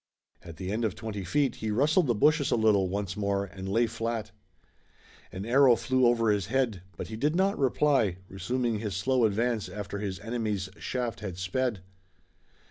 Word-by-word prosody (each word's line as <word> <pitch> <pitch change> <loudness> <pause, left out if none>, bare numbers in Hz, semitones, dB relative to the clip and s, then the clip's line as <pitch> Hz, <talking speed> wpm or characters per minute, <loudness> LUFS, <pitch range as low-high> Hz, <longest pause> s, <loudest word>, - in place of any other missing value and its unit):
At 85 -2 -11
the 95 0 -4
end 110 +3 -1
of 110 -5 0
twenty 110 -3 -5
feet 135 - 0
he 110 - -3
rustled 145 - +3
the 120 - +2
bushes 150 +5 +3
a - - +3
little 105 -4 +3
once 100 -1 -3
more 100 -1 0
and 95 0 -8
lay 115 +4 +3
flat. 115 -2 -3 1.0
An 95 +2 -6
arrow 130 +1 +6
flew 130 +1 +2
over 115 -2 +3
his 100 -4 0
head, 120 -7 0 0.2
but - - -6
he 110 - -5
did 150 +8 0
not 195 +2 +1
reply, 135 -7 +2
resuming 115 +4 -2
his 105 -4 -3
slow 125 +5 +2
advance 110 +1 0
after 100 -1 -5
his 100 -2 -4
enemy's 105 -4 -2
shaft 125 -3 -3
had 95 -5 -6
sped. 100 +3 -1
110 Hz, 180 wpm, -28 LUFS, 100-125 Hz, 1.0 s, arrow